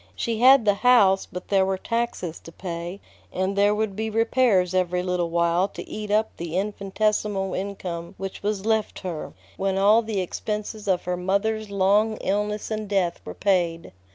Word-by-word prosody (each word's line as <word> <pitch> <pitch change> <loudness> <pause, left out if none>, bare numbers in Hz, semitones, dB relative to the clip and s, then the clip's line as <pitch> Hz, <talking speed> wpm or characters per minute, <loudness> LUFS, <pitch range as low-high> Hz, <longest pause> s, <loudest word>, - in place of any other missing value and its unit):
She 225 - -2
had 260 -1 +7
the 205 - +5
house, 200 -4 +4
but 180 0 -7
there 195 -1 +4
were 190 0 0
taxes 230 -7 -3
to 165 - -12
pay, 175 +1 -6 0.3
and 190 +2 -1
there 205 +1 +3
would 210 -2 -1
be 220 +2 -2
repairs 225 -4 +2
every 180 -1 +1
little 180 -2 -1
while 170 +2 +2
to - - -9
eat 210 -1 -6
up 215 +1 +1
the 170 +1 -4
infinitesimal 200 0 -1
income 185 -3 -5
which 195 0 -6
was 205 -1 -2
left 220 -1 0
her, 175 -5 -5 0.2
when 195 0 0
all 210 +4 +5
the 220 -3 -3
expenses 210 +3 -4
of 185 -2 +1
her 180 0 -2
mother's 200 +4 -1
long 200 +3 +2
illness 210 +2 -2
and 215 -1 -3
death 190 -4 0
were - - -8
paid. 175 -4 0
195 Hz, 175 wpm, -24 LUFS, 180-215 Hz, 0.3 s, had